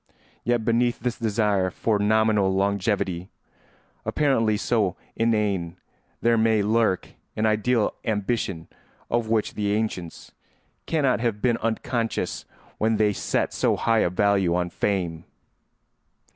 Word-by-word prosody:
Yet, 120 Hz, -2 st, 0 dB
beneath 120 Hz, +1 st, +1 dB
this 120 Hz, 0 st, -3 dB
desire 105 Hz, -4 st, +1 dB
for 105 Hz, +3 st, 0 dB
nominal 105 Hz, -2 st, +3 dB
longevity, 95 Hz, -2 st, 0 dB, 0.7 s
apparently 115 Hz, -8 st, +1 dB
so 105 Hz, -4 st, 0 dB, 0.2 s
inane, 105 Hz, -7 st, 0 dB, 0.4 s
there 115 Hz, -1 st, +3 dB
may 110 Hz, -2 st, +3 dB
lurk 110 Hz, -3 st, +1 dB, 0.3 s
an 110 Hz, -, 0 dB
ideal 110 Hz, +1 st, +2 dB
ambition 105 Hz, -5 st, -2 dB, 0.4 s
of 120 Hz, -2 st, 0 dB
which 110 Hz, -2 st, +1 dB
the 105 Hz, -1 st, -1 dB
ancients 105 Hz, -6 st, -3 dB, 0.6 s
cannot 140 Hz, -7 st, +1 dB
have 115 Hz, -3 st, -1 dB
been 120 Hz, 0 st, +2 dB
unconscious 115 Hz, +1 st, -2 dB, 0.3 s
when 110 Hz, 0 st, +2 dB
they 105 Hz, -1 st, +3 dB
set -, -, -1 dB
so -, -, +1 dB
high 115 Hz, -1 st, +2 dB
a 90 Hz, -, +2 dB
value 95 Hz, -1 st, +2 dB
on 90 Hz, -1 st, -1 dB
fame. 85 Hz, -5 st, -1 dB
110 Hz, 120 wpm, -24 LUFS, 100-115 Hz, 0.7 s, nominal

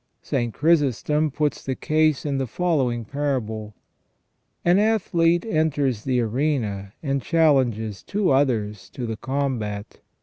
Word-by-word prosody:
St. 120 Hz, -1 st, -1 dB
Chrysostom 150 Hz, -, +2 dB
puts 150 Hz, +1 st, -1 dB
the 130 Hz, -, -2 dB
case 155 Hz, -1 st, +1 dB
in 140 Hz, -2 st, -1 dB
the 135 Hz, -, -1 dB
following 130 Hz, -7 st, 0 dB
parable: 110 Hz, -6 st, -3 dB, 0.4 s
" -, -, -46 dB
An 175 Hz, +3 st, +5 dB
athlete 175 Hz, -5 st, +2 dB
enters 145 Hz, -, 0 dB
the 130 Hz, -2 st, +1 dB
arena 110 Hz, -5 st, -1 dB
and 140 Hz, -2 st, 0 dB
chal 165 Hz, -1 st, +4 dB
lenges 110 Hz, -6 st, -2 dB
two 200 Hz, -4 st, 0 dB
others 105 Hz, -8 st, 0 dB
to 125 Hz, -4 st, -5 dB
the 110 Hz, -1 st, -4 dB
combat. 120 Hz, -6 st, -3 dB
135 Hz, 135 wpm, -23 LUFS, 110-155 Hz, 0.4 s, An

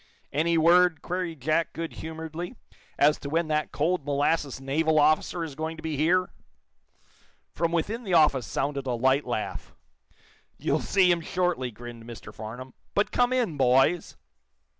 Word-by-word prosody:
"Any 165 Hz, +3 st, +2 dB
word," 170 Hz, 0 st, +4 dB
queried 175 Hz, -4 st, -4 dB
Jack, 155 Hz, +4 st, 0 dB
good 165 Hz, 0 st, -5 dB
humoredly, 160 Hz, +5 st, -6 dB, 0.4 s
"as 150 Hz, +1 st, +4 dB
to 140 Hz, -, -6 dB
when 165 Hz, +1 st, 0 dB
that 155 Hz, 0 st, 0 dB
cold 165 Hz, +2 st, 0 dB
molasses 145 Hz, 0 st, 0 dB
naval 155 Hz, +4 st, +1 dB
officer 155 Hz, +3 st, +2 dB
is 160 Hz, -3 st, -6 dB
going 160 Hz, +2 st, -4 dB
to 155 Hz, -, -11 dB
be 160 Hz, -2 st, -2 dB
here!" 175 Hz, +5 st, +2 dB, 1.2 s
From 165 Hz, +1 st, 0 dB
within 210 Hz, +8 st, -1 dB
the 190 Hz, -5 st, 0 dB
office 150 Hz, -6 st, +4 dB
sounded 140 Hz, -1 st, -2 dB
a 125 Hz, -, 0 dB
light 130 Hz, +4 st, +2 dB
laugh. 120 Hz, -3 st, -4 dB, 0.8 s
"You'll -, -, 0 dB
see 185 Hz, -3 st, +3 dB
him 170 Hz, -1 st, +1 dB
shortly," 175 Hz, -7 st, -1 dB
grinned 120 Hz, 0 st, -10 dB
Mr. 120 Hz, -1 st, -10 dB
Farnum. 120 Hz, +4 st, -8 dB, 0.2 s
"But 205 Hz, -, +1 dB
come 245 Hz, 0 st, +2 dB
in, 235 Hz, -, 0 dB
boys." 135 Hz, +6 st, +2 dB
160 Hz, 155 wpm, -27 LUFS, 135-170 Hz, 1.2 s, word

